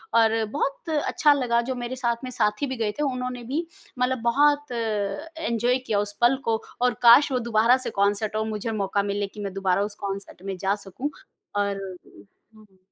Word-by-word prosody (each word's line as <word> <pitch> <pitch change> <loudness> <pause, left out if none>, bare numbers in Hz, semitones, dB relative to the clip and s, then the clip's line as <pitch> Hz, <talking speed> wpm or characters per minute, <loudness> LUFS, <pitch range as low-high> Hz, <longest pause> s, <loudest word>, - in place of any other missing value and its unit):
और 225 -1 +4
बहुत 280 +4 -2
अच्छा 300 0 +3
लगा 245 -4 +1
जो 260 - -1
मेरे 245 +1 -4
साथ 235 -2 -1
में 255 - -4
साथी 210 +5 0
भी 260 - -3
गए 220 -2 0
थे - - +1
उन्होंने 250 -2 -3
भी 285 +8 -2 0.3
मतलब 250 -1 +1
बहुत 290 +2 +3
अ, - - -3 0.7
एन्जॉय 240 -1 +1
किया 225 -6 -1
उस 205 0 -2
पल 240 +3 +5
को। 225 -1 +1 0.2
और 250 -1 +3
काश 245 +4 +7
वो 255 - +1
दोबारा 230 +3 +5
से - - 0
कॉन्सर्ट 205 +1 +1
हो 215 - +1
और 220 - -2
मुझे 215 +1 -3
मौका 200 -1 0
मिले 200 0 -1
कि 210 - -13
मैं 195 -1 -4
दोबारा 195 0 +1
उस - - -10
कॉन्सर्ट 195 -2 -6
में 195 -1 -3
जा 195 +2 +1
सकूँ। 255 +10 -4 0.4
और 200 -1 0 0.8
हुँ। 210 -3 -20
230 Hz, 200 wpm, -25 LUFS, 205-255 Hz, 0.8 s, काश